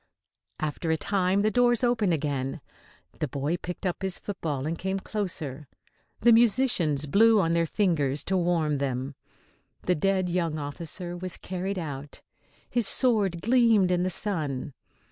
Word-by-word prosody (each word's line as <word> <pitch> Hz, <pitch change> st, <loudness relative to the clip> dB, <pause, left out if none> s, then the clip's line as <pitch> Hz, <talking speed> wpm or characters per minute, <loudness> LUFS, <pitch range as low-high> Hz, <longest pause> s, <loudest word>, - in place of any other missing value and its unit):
After 155 Hz, +2 st, -3 dB
a 160 Hz, -, +2 dB
time 190 Hz, +2 st, +1 dB
the 215 Hz, +1 st, +2 dB
doors 245 Hz, 0 st, +3 dB
opened 230 Hz, -6 st, +2 dB
again. 145 Hz, -1 st, -2 dB, 0.6 s
The -, -, -1 dB
boy 145 Hz, +5 st, -2 dB
picked 180 Hz, +2 st, -7 dB
up 180 Hz, 0 st, -2 dB
his 190 Hz, -1 st, -2 dB
football 155 Hz, -9 st, -4 dB
and 160 Hz, +2 st, -1 dB
came 190 Hz, +3 st, -2 dB
closer. 160 Hz, -10 st, -4 dB, 0.5 s
The 235 Hz, +1 st, +6 dB
musicians 225 Hz, -, +3 dB
blew 220 Hz, +8 st, +5 dB
on 165 Hz, -4 st, +1 dB
their 170 Hz, 0 st, +2 dB
fingers 150 Hz, -8 st, 0 dB
to 190 Hz, -, -1 dB
warm 170 Hz, -5 st, +1 dB
them. 135 Hz, 0 st, -2 dB, 0.7 s
The 180 Hz, -, +2 dB
dead 190 Hz, +2 st, +1 dB
young 170 Hz, -3 st, -1 dB
officer 165 Hz, +4 st, -5 dB
was 180 Hz, 0 st, -5 dB
carried 190 Hz, +2 st, -4 dB
out. 145 Hz, -4 st, -6 dB, 0.4 s
His 240 Hz, -4 st, +1 dB
sword 205 Hz, -10 st, +3 dB
gleamed 230 Hz, -6 st, +4 dB
in 175 Hz, -1 st, +2 dB
the 185 Hz, -, 0 dB
sun. 155 Hz, -9 st, -2 dB
175 Hz, 150 wpm, -27 LUFS, 150-200 Hz, 0.7 s, The